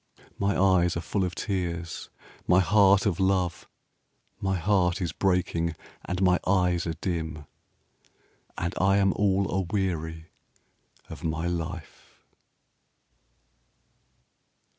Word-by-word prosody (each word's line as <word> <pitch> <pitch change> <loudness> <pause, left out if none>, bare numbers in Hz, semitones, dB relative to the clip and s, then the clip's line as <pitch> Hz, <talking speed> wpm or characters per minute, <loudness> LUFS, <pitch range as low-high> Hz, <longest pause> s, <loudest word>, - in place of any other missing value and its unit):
My 100 0 +1
eyes 90 -3 +3
are - - -2
full 95 +3 -1
of 90 -1 -3
tears, 85 -4 -3 0.4
my 90 - +5
heart 100 0 +4
of 95 -5 0
love, 95 -2 0 0.7
30 - - -15
My 95 0 +1
heart 90 -1 +1
is 85 -5 -2
breaking, 85 -3 0 0.3
and 90 +1 -2
my 90 -1 +4
eyes 90 -2 +2
are 80 - -2
dim, 80 -4 -3 1.1
And 85 +2 -2
I 95 +1 +4
am 95 -1 +3
all 100 -1 +2
aweary 85 -4 -2 0.8
of - - -10
my 80 0 -2
life.' 85 0 -6
90 Hz, 115 wpm, -27 LUFS, 85-95 Hz, 1.1 s, my